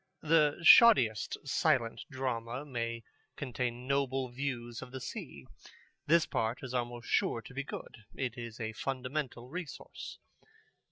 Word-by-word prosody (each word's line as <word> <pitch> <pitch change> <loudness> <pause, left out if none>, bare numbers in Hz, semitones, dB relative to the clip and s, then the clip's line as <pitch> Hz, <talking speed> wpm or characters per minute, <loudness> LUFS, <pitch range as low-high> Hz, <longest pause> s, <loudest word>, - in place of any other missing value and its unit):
The 155 -2 +4
shoddiest 135 - +7
silent 125 -6 +1
drama 130 -1 -3
may 115 -4 -3 0.3
contain 125 -2 -3
noble 135 -1 0
views 120 -3 -4
of 125 - -9
the 130 - -5
sea. - - -7 0.6
This 165 +1 +5
part 115 +4 -1
is 130 -1 -5
almost 120 -1 -3
sure 115 - +1
to 130 - -11
be 140 +2 -3
good. - - -8 0.2
It 125 -3 -2
is 120 -2 -7
a 110 -1 -3
fundamental 130 0 -3
resource. 150 -3 -7
125 Hz, 130 wpm, -32 LUFS, 120-140 Hz, 0.6 s, shoddiest